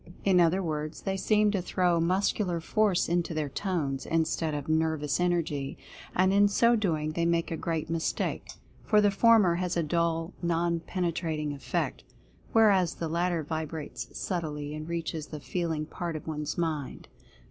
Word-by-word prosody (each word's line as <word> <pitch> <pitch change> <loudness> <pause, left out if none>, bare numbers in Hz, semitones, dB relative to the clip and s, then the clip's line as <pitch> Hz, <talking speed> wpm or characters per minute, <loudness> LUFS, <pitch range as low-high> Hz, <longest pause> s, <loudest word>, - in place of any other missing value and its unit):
In 190 -2 +5
other 175 +3 +3
words, 155 -1 -3
they 195 - -1
seem 210 +2 +3
to 195 -3 0
throw 175 -1 +1
muscular 180 +1 +1
force 200 +2 +1
into 170 -1 0
their 150 -2 -1
tones, 145 -5 -2
instead 160 -1 0
of 145 -1 -4
nervous 155 -2 +1
energy, 165 -6 -1 0.4
and 185 +1 +3
in 205 +1 +6
so 235 +4 +4
doing 160 -8 0
they 170 +2 -1
make 170 0 +1
a - - 0
great 160 -1 -2
mistake, 165 0 -2 0.3
for 210 - +4
the 205 -1 +4
former 210 -3 +5
has 180 -1 -1
a 170 - +2
dull, 165 +2 0
non 170 0 +1
penetrating 165 -4 -2
effect, 140 - -3 0.5
whereas 200 -6 +4
the 165 - -3
latter 170 0 0
vibrates 150 -5 -5
subtly 150 -5 -3
and 155 +1 -6
reaches 165 -2 -3
the 155 - -7
feel 165 +6 -2
ing 155 -1 -2
part 170 +1 -5
of 155 - -6
one's 150 -1 -4
mind. 155 -5 -3
170 Hz, 165 wpm, -28 LUFS, 155-180 Hz, 0.5 s, in